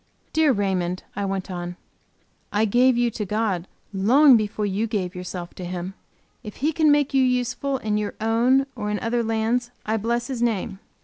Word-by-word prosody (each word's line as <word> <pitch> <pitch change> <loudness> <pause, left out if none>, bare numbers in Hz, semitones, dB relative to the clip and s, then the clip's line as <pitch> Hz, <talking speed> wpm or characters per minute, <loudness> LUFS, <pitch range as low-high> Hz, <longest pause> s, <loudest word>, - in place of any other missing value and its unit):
"Dear 315 -2 +4
Raymond," 185 -5 -1
I 200 0 -2
went 195 -1 -3
on, 175 0 -5 0.8
"I 210 +2 +2
gave 245 +3 +4
you 240 -1 +2
to 215 - -4
God 200 -3 -1 0.3
long 250 +8 +6
before 210 -1 0
you 205 +3 -1
gave 195 -5 -2
yourself 180 -1 -6
to 185 - -8
Him. 180 +1 -5 0.5
If 210 - -9
He 305 +4 0
can 310 -1 +4
make 290 -1 +2
you 270 - +4
useful 250 +2 0
in 215 -4 -1
your 210 -1 -3
own, 235 +5 +3
or 210 -3 -3
in 210 - -1
other 235 +3 0
lands, 225 +2 0 0.2
I 220 +1 0
bless 235 +3 -1
His 260 -4 -4
name. 215 -4 -1
220 Hz, 185 wpm, -23 LUFS, 195-245 Hz, 0.8 s, long